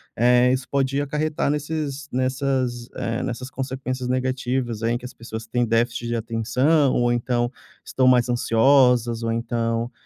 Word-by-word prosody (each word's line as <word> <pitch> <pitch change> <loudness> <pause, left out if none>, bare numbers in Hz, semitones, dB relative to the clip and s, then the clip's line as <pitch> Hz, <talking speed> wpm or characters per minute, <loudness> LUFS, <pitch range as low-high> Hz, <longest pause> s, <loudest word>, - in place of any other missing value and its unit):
eh, 125 +2 +4
isso 130 0 -2
pode 140 0 0
acarretar 150 +1 -1
nesses 150 -1 -3
nessas, 130 -2 -1
eh, 115 +1 -2
nessas 125 +1 -4
consequências 130 -1 -4
negativas 130 -2 -1
aí, 115 +1 +1
em - - 0
que 120 - -14
as 125 - -8
pessoas 110 -1 -8
têm 120 +2 0
déficit 115 +1 0
de 120 - -1
atenção 125 +6 +1
ou 120 0 +2
então 120 0 0 0.3
estão 130 -1 +1
mais 125 -1 +4
ansiosas 120 -1 +3
ou 115 0 -1
então, 115 0 -2
125 Hz, 155 wpm, -23 LUFS, 115-130 Hz, 0.3 s, eh